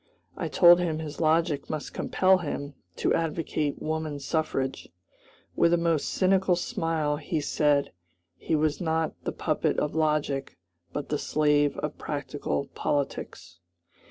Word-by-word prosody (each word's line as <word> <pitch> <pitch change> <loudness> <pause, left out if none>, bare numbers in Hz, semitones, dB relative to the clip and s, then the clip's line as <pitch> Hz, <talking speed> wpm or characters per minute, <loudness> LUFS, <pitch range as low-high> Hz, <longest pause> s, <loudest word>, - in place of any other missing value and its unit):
I - - -3
told 175 0 +7
him 165 -3 -1
his 155 -1 -6
logic 160 -2 +1
must 155 -2 -4
compel 190 0 +3
him 145 -3 -4 0.2
to - - +1
advocate 155 -2 -1
woman 155 -1 -3
suffrage. 140 -2 -2 0.7
With 170 - +4
a - - +5
most 165 -3 +1
cynical 190 -1 +3
smile 160 -3 -1
he 155 +1 -2
said 145 -1 +1 0.4
"he 160 - -1
was 155 +2 0
not 160 -1 0
the - - -1
puppet - - -1
of 150 - 0
logic, 150 -3 0 0.3
but 145 - -5
the 150 - -1
slave 150 -1 +2
of - - -4
practical 70 -1 -3
politics." 110 - -3
155 Hz, 135 wpm, -27 LUFS, 145-165 Hz, 0.7 s, told